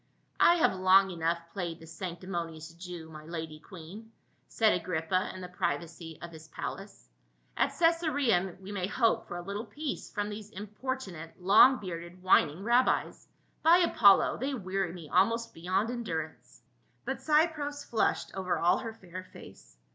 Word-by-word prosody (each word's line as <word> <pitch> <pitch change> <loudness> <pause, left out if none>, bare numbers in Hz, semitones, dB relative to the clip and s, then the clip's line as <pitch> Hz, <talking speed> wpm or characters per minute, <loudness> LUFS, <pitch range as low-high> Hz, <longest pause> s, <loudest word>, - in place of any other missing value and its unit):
" - - -43
I 345 - +7
have 330 - +3
long 190 +1 +5
enough 165 0 0 0.2
played 170 -4 -4
the 165 - -12
sanctimonious 170 -1 -6
Jew, 175 -1 -8
my 155 -1 -10
lady 160 -1 -6
queen," 190 +7 -11 0.4
said 220 -1 +3
Agrippa 180 +1 -1
in 185 - -8
the 180 - -6
privacy 170 -2 -4
of 170 - -7
his 160 -1 -12
24G - - -31
PAUL. - - -7
palace. - - -7 0.5
"At - - +2
Cacsarea 285 - +1
we 195 +1 -9
may 185 -3 -2
hope 225 +1 +1
for 175 - -5
a 175 - -6
little 200 +5 -5
peace 290 +6 -5
from 205 -2 -3
these 210 0 -7
importunate 205 - -6
long 215 +8 +7
bearded 175 -2 -8
whining 175 -1 +3
rabbis. 240 +3 +1 0.3
By 330 +2 +7
Apollo! 220 - +5
they 270 +3 -2
weary 190 -4 -2
me 170 -3 -9
almost 230 +8 +2
beyond 185 +6 -1
endur 170 -11 -3
ance." 125 0 -24 0.4
But 265 +1 -2
Cypros 300 -2 +1
flushed 225 - 0
over 190 -1 -1
all 175 +1 +3
her 225 -2 -6
fair 185 -3 -9
face. - - -14
185 Hz, 165 wpm, -30 LUFS, 170-225 Hz, 0.5 s, I